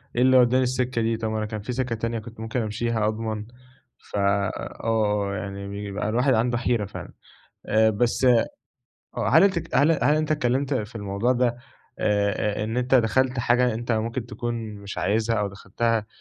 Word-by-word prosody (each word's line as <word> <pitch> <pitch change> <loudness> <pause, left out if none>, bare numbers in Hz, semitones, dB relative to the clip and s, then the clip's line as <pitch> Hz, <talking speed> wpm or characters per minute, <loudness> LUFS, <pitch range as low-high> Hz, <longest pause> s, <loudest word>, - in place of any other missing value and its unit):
إيه 120 - +1
اللي 130 0 +6
ودَّاني 125 +1 +4
السكة 125 -1 -1
دي؟ 115 0 0
طب 110 0 -2
ما 110 - -2
أنا 110 - -1
كان 105 0 -5
في 115 - -5
سكة 125 -2 -1
تانية 115 +1 -2
كنت 115 0 -12
ممكن 110 +2 -2
أمشيها 110 0 -1
أضمن؟ 110 -1 -3 0.7
ف - - -6
آه، 100 +1 0
يعني 100 0 -5
بيبقى 100 +1 -4
الواحد 125 +4 +2
عنده 120 +1 +1
حيرة 120 -3 0
فعلًا 100 - -9 0.5
آآ، 110 +1 +4
بس 120 +4 +1
آه، 120 -3 +5 0.8
هل 160 - +6 0.3
هل 145 +3 +5
هل 150 - +4
أنت 155 0 -1
اتكلمت 135 0 0
في 110 -1 -3
الموضوع 100 +3 0
ده 120 -1 +1 0.4
آآ، 105 0 0
إن 110 +2 -3
أنت 125 +1 +1
دخلت 130 +2 +3
حاجة 120 0 +2
أنت 120 +1 -2
ممكن 115 +2 -2
تكون 120 +1 -4 0.2
مش 100 -1 -8
عايزها 110 +3 +1
أو 105 -1 0
دخلتها 105 +3 -1
115 Hz, 175 wpm, -24 LUFS, 105-125 Hz, 0.8 s, اللي